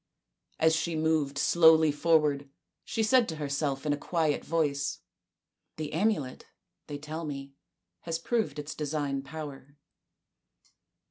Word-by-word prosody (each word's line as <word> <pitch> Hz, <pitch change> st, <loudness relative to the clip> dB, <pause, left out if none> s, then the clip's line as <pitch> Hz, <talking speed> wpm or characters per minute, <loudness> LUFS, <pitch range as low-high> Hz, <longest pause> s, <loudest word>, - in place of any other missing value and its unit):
As 160 Hz, 0 st, +4 dB
she 165 Hz, +1 st, -1 dB
moved 155 Hz, -3 st, +1 dB
slowly 160 Hz, -1 st, +6 dB
forward 150 Hz, -2 st, +2 dB, 0.3 s
she 225 Hz, -, -1 dB
said 240 Hz, 0 st, +4 dB
to 160 Hz, -, -3 dB
herself 140 Hz, -1 st, -2 dB
in 150 Hz, -, +2 dB
a -, -, -2 dB
quiet 155 Hz, -1 st, 0 dB
voice, 145 Hz, -4 st, -1 dB, 0.4 s
" -, -, -56 dB
The 155 Hz, -1 st, -4 dB
amulet, 160 Hz, -8 st, -1 dB, 0.4 s
they 145 Hz, -2 st, -5 dB
tell 155 Hz, +3 st, -6 dB
me, 140 Hz, -2 st, -6 dB, 0.5 s
has 165 Hz, -1 st, -3 dB
proved 220 Hz, +4 st, -1 dB
its 150 Hz, +1 st, -5 dB
divine 145 Hz, -2 st, -2 dB
power." 140 Hz, -1 st, -9 dB
150 Hz, 130 wpm, -29 LUFS, 140-160 Hz, 0.5 s, slowly